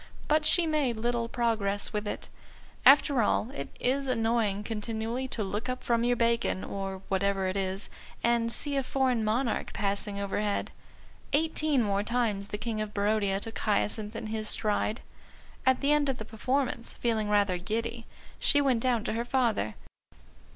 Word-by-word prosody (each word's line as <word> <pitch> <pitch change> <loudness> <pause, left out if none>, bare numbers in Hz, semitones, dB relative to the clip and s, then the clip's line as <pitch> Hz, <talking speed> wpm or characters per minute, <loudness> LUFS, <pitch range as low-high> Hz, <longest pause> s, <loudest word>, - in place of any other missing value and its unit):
But 305 0 +3
she 340 +2 +5
made 295 -7 +1
little 235 +1 -1
progress 215 -4 0
with 210 0 -2
it. - - -4 0.6
After 275 -2 +6
all, 220 +3 +1
it 280 - -6
is 270 +2 0
annoying 225 -4 +1
continually 225 +3 -3
to 230 -4 -2
look 210 +5 -3
up 255 0 -3
from 235 -1 +1
your 245 0 +3
bacon, 230 -4 +1
or 195 -1 -5
whatever 195 0 +1
it 185 - -2
is, 195 0 -2 0.4
and 235 -1 +2
see 285 +3 +1
a 275 - +2
foreign 255 -3 +1
monarch 225 +3 0
passing 200 0 -1
overhead. 200 +1 -1 0.6
Eighteen 305 -3 +2
more 200 -1 +1
times 215 -3 -1
the 210 - -4
King 220 0 -3
of 210 -1 -5
Barodia 200 -1 +1
took 225 +2 -6
Hyacinth 210 0 0
in 225 0 -5
his 215 0 -2
stride. 215 +1 0 0.7
At 260 -1 +4
the 285 +1 +3
end 295 -2 +2
of 265 - -1
the 220 - -6
performance, 245 +2 -1
feeling 220 -3 -1
rather 200 -3 +2
giddy, 230 +4 -3 0.3
she 290 - +4
went 265 -4 +3
down 240 -3 +1
to - - -2
her 230 +1 -1
father. 235 - 0
225 Hz, 165 wpm, -29 LUFS, 205-250 Hz, 0.7 s, After